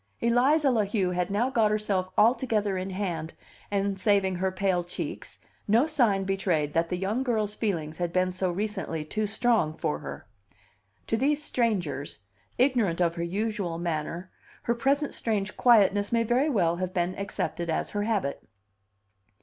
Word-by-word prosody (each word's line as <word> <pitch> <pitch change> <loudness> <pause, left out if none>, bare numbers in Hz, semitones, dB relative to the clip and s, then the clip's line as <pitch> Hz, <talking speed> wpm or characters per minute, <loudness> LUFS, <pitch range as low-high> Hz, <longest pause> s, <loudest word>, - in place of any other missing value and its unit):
Eliza 265 +5 +3
La 225 -4 +2
Heu 195 -3 0
had 180 0 -1
now 225 +6 0
got 225 -4 +3
herself 205 -3 0
altogether 215 -3 +2
in 185 +1 -3
hand, 175 -4 -4 0.3
and, 200 -1 -1
saving 190 -2 +2
her 190 +1 0
pale 185 -2 0
cheeks, 175 - -6 0.3
no 225 +6 +4
sign 240 -11 +2
betrayed 180 -6 0
that 165 0 +1
the 180 - -1
young 200 +7 -1
girl's 220 -5 0
feelings 165 -9 -2
had 175 -1 -2
been 185 +1 +1
so 185 0 -1
recently 190 -4 -3
too 215 +7 -2
strong 220 -7 +1
for 150 - -1
her. - - -8 0.8
To 225 - 0
these 290 +4 +1
strangers, 180 - -1 0.4
ignorant 240 -10 +2
of 170 -2 +2
her 170 0 -3
usual 195 -1 -2
manner, 170 +2 -3 0.3
her 235 - +1
present 275 +5 0
strange 210 -3 -2
quietness 205 -4 +4
may 230 -1 +3
very 250 +6 +2
well 175 - +2
have 185 0 -4
been 175 0 0
accepted 185 -3 -3
as 160 - -1
her 205 - -1
habit. 205 -10 -1
200 Hz, 160 wpm, -27 LUFS, 180-225 Hz, 0.8 s, no